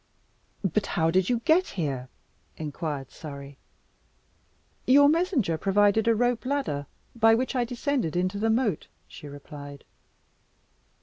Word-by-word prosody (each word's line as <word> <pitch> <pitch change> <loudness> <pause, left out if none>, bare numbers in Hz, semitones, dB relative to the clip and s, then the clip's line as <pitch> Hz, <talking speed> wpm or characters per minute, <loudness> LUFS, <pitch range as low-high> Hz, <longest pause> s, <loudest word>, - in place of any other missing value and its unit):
"But 200 +2 0
how 165 -1 +3
did 185 +1 +2
you 240 -2 +1
get 330 +8 +3
here?" 135 -6 -2 0.5
inquired 150 -3 -5
Surrey. 140 -2 -9 1.3
"Your 285 +2 +7
messenger 300 - +1
provided 205 +3 +3
a 230 - +4
rope 245 +1 +1
ladder, 255 - -2 0.3
by 225 -1 +5
which 255 +3 -2
I 245 -1 +1
descended 245 - -2
into 185 +3 0
the 225 +2 +1
moat," 220 - 0 0.2
she 150 - -11
replied. 145 0 -10
200 Hz, 125 wpm, -26 LUFS, 150-245 Hz, 1.3 s, Your